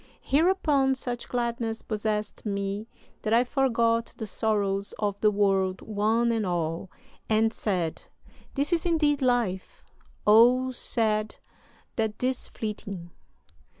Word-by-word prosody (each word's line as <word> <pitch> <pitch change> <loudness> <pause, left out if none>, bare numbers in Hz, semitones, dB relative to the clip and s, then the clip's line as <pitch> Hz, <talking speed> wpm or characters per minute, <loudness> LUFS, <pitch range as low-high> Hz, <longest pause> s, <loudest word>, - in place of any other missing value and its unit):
Hereupon 290 -4 +2
such 245 -2 -5
gladness 235 -2 -2
possessed 210 -1 -3
me 200 +1 -3 0.3
that 215 - -1
I 240 - +5
forgot 235 -3 +1
the 220 - -4
sorrows 200 -2 -1
of 205 -1 -2
the 215 - +5
world 195 -2 +1
one 220 +3 +1
and 225 -2 0
all, 170 -1 -2 0.4
and 220 +1 +3
said: 180 -6 -2 0.5
"This 290 +5 0
is 335 - +1
indeed 300 -4 +2
life 240 -8 0 0.4
O 245 +4 +6
sad 215 -3 0 0.6
that 220 -2 -1
'tis 255 0 -1
fleeting!'" 200 -5 -6
220 Hz, 115 wpm, -27 LUFS, 205-245 Hz, 0.6 s, O